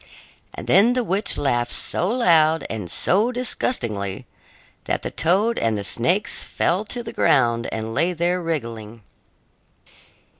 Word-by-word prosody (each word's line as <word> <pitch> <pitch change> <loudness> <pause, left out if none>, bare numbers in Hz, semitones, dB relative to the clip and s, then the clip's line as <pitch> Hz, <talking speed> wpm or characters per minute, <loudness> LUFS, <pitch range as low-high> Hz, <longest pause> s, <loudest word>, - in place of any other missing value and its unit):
And - - -7
then 225 +5 +5
the 250 -1 0
witch 200 +1 0
laughed 120 -4 -1
so 180 - -1
loud 165 -9 +3
and 105 -6 -5
so 210 - +2
disgustingly 115 - -2 0.6
that - - -2
the - - -4
toad 200 +8 +1
and 110 -2 0
the 100 - -4
snakes 175 - +1
fell 185 +5 -1
to 240 +3 -5
the - - -8
ground 120 -4 +2
and 110 0 -4
lay 170 +9 +1
there 175 +2 -1
wriggling. 115 -9 -5
165 Hz, 140 wpm, -22 LUFS, -, 0.6 s, then